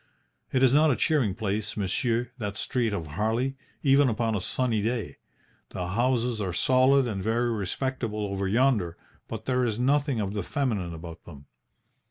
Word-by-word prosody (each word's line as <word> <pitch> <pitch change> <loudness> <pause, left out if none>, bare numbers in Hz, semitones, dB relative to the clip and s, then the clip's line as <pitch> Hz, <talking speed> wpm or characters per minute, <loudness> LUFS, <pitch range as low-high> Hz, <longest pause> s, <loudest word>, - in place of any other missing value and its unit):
It 130 0 +2
is 130 -1 +5
not 155 +2 +5
a 135 - +3
cheering 130 - +1
place, 105 -1 -3
monsieur, 115 +5 0
that 105 -2 -4
street 120 -5 0
of 85 -6 -3
Harley, 110 - -1 0.3
even 140 -1 +5
upon 115 0 0
a 100 - -1
sunny 115 +2 0
day. 110 - -2 0.5
The 90 -1 -4
houses 120 +1 +1
are 95 -3 -2
solid 130 +7 +4
and 105 -5 -3
very 115 +4 +1
respectable 110 +1 -2
over 100 -1 -2
yonder, 105 -6 +2 0.3
but 110 0 -6
there 125 -1 +1
is 110 -3 0
nothing 140 0 +1
of 100 -1 -2
the 105 - -2
feminine 100 -7 -2
about 80 0 -10
them. 70 -4 -12
115 Hz, 170 wpm, -27 LUFS, 100-130 Hz, 0.5 s, is